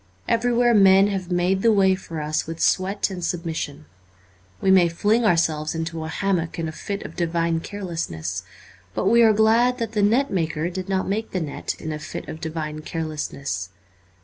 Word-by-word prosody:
Everywhere 240 +1 +3
men 195 -1 +6
have 190 -3 -3
made 180 +2 +1
the 230 - +4
way 195 -2 +4
for 165 -4 -5
us 155 +1 -1
with 165 0 -6
sweat 195 +2 +1
and 180 -2 -6
sub 175 0 -2
mission. 155 - -4 0.7
We 190 - +2
may 180 -3 +6
fling 210 +7 +1
ourselves 160 -4 +1
into 165 0 -3
a - - -4
hammock 170 0 -1
in 165 -1 -2
a - - -4
fit 200 +5 -5
of - - -8
divine 170 -1 0
carelessness. 165 - -4 0.5
But - - -1
we 235 +4 +5
are 225 -1 +7
glad 225 +4 +3
that 230 -3 -3
the 215 -2 0
net 235 +7 +3
maker 165 -2 -1
did 185 +1 -5
not 190 -1 0
make 220 +3 -2
the 185 - 0
net 155 -4 -4
in 155 - -5
a 150 - -4
fit - - -7
of 155 - -7
divine 155 -2 -4
carelessness. 150 - -4
180 Hz, 190 wpm, -23 LUFS, 160-205 Hz, 0.7 s, are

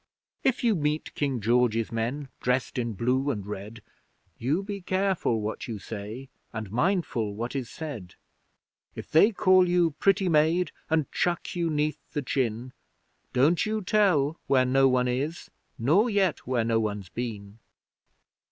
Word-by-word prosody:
If 260 -2 +1
you 230 -2 +4
meet 150 -3 -1
King 140 -4 -1
George's 115 0 +2
men, 125 +5 -3
dressed 125 0 0
in 115 -2 -2
blue 125 +6 0
and 105 -8 -3
red, 105 +2 -7 0.6
You 150 +11 0
be 200 0 -5
careful 185 - 0
what 105 +1 -4
you 115 -3 -4
say, 110 +5 -7 0.2
and 110 -3 -6
mindful 125 - 0
what 120 +5 -4
is 130 -4 -3
said. 125 - -7 0.8
If - - -8
they 200 +8 +6
call 185 -2 +4
you 175 -2 +3
'pretty 195 +5 +2
maid,' 165 +2 +3 0.2
and 160 -2 +2
chuck 175 0 -1
you 170 -1 0
'neath 150 0 0
the 145 - -2
chin, 125 -1 -2 0.6
Don't 150 +7 +3
you 215 -1 -2
tell 180 -7 +2
where 130 -2 +4
no 135 +1 +4
one 125 -1 +2
is, 140 +7 -3 0.3
nor 170 - +3
yet 195 - 0
where 125 -3 +1
no 115 -1 +2
one's 105 -4 -3
been! 105 -3 -6
135 Hz, 150 wpm, -27 LUFS, 115-170 Hz, 0.8 s, they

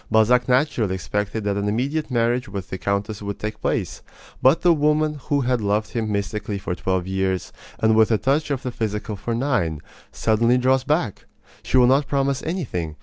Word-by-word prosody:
Balzac 120 +3 +3
naturally 125 -7 +2
expected 105 +4 -3
that 100 -1 -1
an 100 0 -1
immediate 140 +8 -1
marriage 120 -1 0
with 95 -1 -6
the 95 - -4
countess 100 +1 -2
would 100 -1 -4
take 105 0 -5
place; - - -2 0.4
but 135 +5 +4
the 175 -1 +6
woman 150 0 +1
who 145 -1 +1
had 125 -2 0
loved 105 +1 0
him 110 -3 -2
mystically 105 0 -2
for 95 -2 -4
twelve 95 0 -1
years, 95 -1 -2 0.2
and 110 0 +3
with 110 -1 +5
a 110 - +3
touch 140 +6 0
of 140 -2 -2
the 125 - -3
physical 110 -3 -3
for 115 +4 -3
nine, 90 - 0 0.3
suddenly 115 +3 +2
draws 130 +1 +2
back. 145 - -1 0.3
She - - 0
will 125 - +7
not 135 +3 +3
promise 140 -1 0
anything. 100 - -3
115 Hz, 190 wpm, -22 LUFS, 100-135 Hz, 0.4 s, will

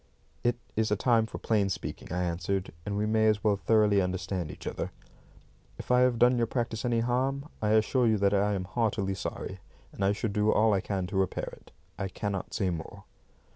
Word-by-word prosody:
"It 120 0 +2 0.2
is 110 0 +1
a 105 - +2
time 115 +1 +3
for - - -7
plain 105 -3 +1
speaking," 95 - -5
I 90 0 0
answered, 90 +2 -2
"and 100 0 -1
we 105 - +1
may 110 0 +3
as 105 -1 +2
well 105 -2 +3
thoroughly 105 -1 +3
understand 90 -2 -2
each 75 - -10
other. - - -3 0.9
If - - -5
I 125 - +6
have 125 -1 +3
done 120 +1 +4
your 115 - +2
practice 115 -2 -2
any 120 -2 +1
harm, 135 +4 0
I 105 0 +2
assure 115 +3 +3
you 110 -1 +3
that 100 0 +2
I 100 +1 +2
am 95 - -2
heartily 105 -1 0
sorry, 95 0 -5 0.3
and 100 - -4
I 95 - +4
shall 110 +1 -2
do 105 +1 +2
all 110 0 +4
I 95 - +2
can 95 -2 -2
to 95 +2 -4
repair 95 -1 -1
it. - - -21 0.3
I 100 - -1
cannot 100 0 -4
say 95 -3 +1
more." 85 +4 -7
105 Hz, 210 wpm, -29 LUFS, 95-115 Hz, 0.9 s, I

